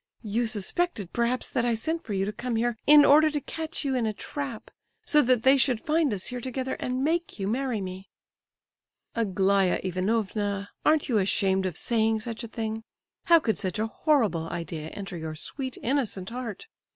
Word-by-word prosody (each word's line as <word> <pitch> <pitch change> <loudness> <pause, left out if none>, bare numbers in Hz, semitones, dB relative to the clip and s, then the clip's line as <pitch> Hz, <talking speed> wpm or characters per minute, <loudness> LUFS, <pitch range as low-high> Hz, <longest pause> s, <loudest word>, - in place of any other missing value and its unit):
you 225 +3 0
suspected, 215 - -1
perhaps, 240 +1 0
that 250 - -1
I 240 -1 +2
sent 320 +9 -2
for 215 - -5
you 195 0 0
to 210 - -3
come 240 +2 -3
here 235 +1 +1
in 295 0 +9
order 310 +2 +6
to 295 -1 -2
catch 320 +2 -5
you 270 - 0
in 245 -3 +1
a 215 - -1
trap, 275 +1 -6 0.3
so 300 - +5
that 250 -3 +2
they 265 +1 +6
should 255 -3 +2
find 310 +1 +1
us 195 -3 -3
here 250 -1 -3
together, 260 +1 -3
and 255 +1 -2
make 335 +3 -1
you 195 - -1
marry 245 -1 -1
me—" 185 0 -7 1.0
"Aglaya 195 -3 +2
Ivanovna, 200 +1 -1
aren't 305 -1 +3
you 230 -5 +2
ashamed 190 -1 +1
of 175 -3 -4
saying 220 -2 +1
such 230 0 -5
a - - -5
thing? 220 0 -4 0.4
How 335 -1 +7
could 220 -8 -1
such 185 -1 -2
a 215 - 0
horrible 220 - +1
idea 165 -2 -5
enter 195 0 -7
your 160 -1 -5
sweet, 260 - -5
innocent 230 -7 -1
heart? 245 - -6
230 Hz, 190 wpm, -27 LUFS, 200-265 Hz, 1.0 s, in